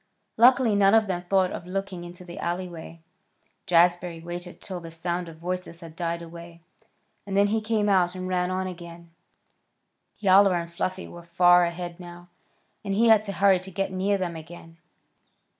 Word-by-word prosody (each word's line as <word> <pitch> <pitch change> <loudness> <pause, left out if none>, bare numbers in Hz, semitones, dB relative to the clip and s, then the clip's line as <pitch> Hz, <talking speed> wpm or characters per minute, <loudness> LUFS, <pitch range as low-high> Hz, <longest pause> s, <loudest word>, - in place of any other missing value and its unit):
Luckily 245 -1 +5
none 200 +1 +4
of 220 -1 +4
them 180 -3 -3
thought 190 -2 +2
of 175 - -7
looking 190 -1 -4
into 175 +1 -11
the 175 -1 -9
alleyway. 170 -2 -5 0.7
Jazbury 175 -1 +2
waited 175 +1 -8
till 185 -2 -6
the 165 -1 -10
sound 170 +1 -4
of 160 - -12
voices 180 0 -5
had 165 -1 -11
died 170 0 -3
away, 170 0 -12 0.6
and 195 0 -2
then 200 0 +4
he 220 +1 0
came 215 -1 0
out 185 -3 +2
and 185 0 -5
ran 180 -1 0
on 185 0 -2
again. 170 -2 -9 1.1
Yowler 195 -1 +5
and 170 -1 -4
Fluffy 185 +2 -3
were 175 - -11
far 175 +1 +4
ahead 175 0 -6
now, 175 0 -12 0.5
and 195 -2 -2
he 230 +2 +4
had 220 -2 +6
to 210 -2 -5
hurry 195 -1 +3
to 185 +1 -10
get 195 +1 -3
near 195 +2 0
them 180 -3 -3
again. 165 0 -12
180 Hz, 175 wpm, -25 LUFS, 170-195 Hz, 1.1 s, had